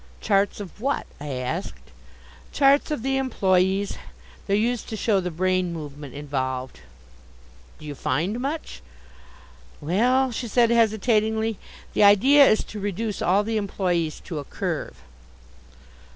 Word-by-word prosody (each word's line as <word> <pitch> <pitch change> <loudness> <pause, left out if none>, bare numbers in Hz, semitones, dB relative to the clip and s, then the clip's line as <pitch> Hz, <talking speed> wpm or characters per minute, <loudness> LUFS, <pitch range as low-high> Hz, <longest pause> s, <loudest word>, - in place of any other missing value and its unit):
"Charts 200 -1 +1
of 205 +1 -9
what?" 275 +3 -1
I 150 - -7
asked. 130 +9 -5 0.6
"Charts 280 +2 +4
of 300 -7 -3
the 270 0 0
employes; 195 -6 +1 0.5
they're 200 - +2
used 230 +2 -1
to 220 - -4
show 210 -2 +2
the 180 -1 -3
brain 185 +1 0
movement 145 -4 -8
involved." 130 -3 -4 1.0
"Do 155 - -13
you 150 - -5
find 180 - -1
much?" 285 +5 -4 1.0
"Well," 245 - +2
she 240 +1 -4
said 235 +1 +3
hesitatingly, 220 -1 +2 0.3
"the - - +1
idea 265 +8 +7
is 215 - +2
to 210 - -8
reduce 205 +2 -3
all 195 +4 +3
the 220 +1 -2
employes 180 -6 -1
to 160 -4 -6
a - - -5
Curve." 65 - -4
200 Hz, 135 wpm, -24 LUFS, 170-230 Hz, 1.0 s, idea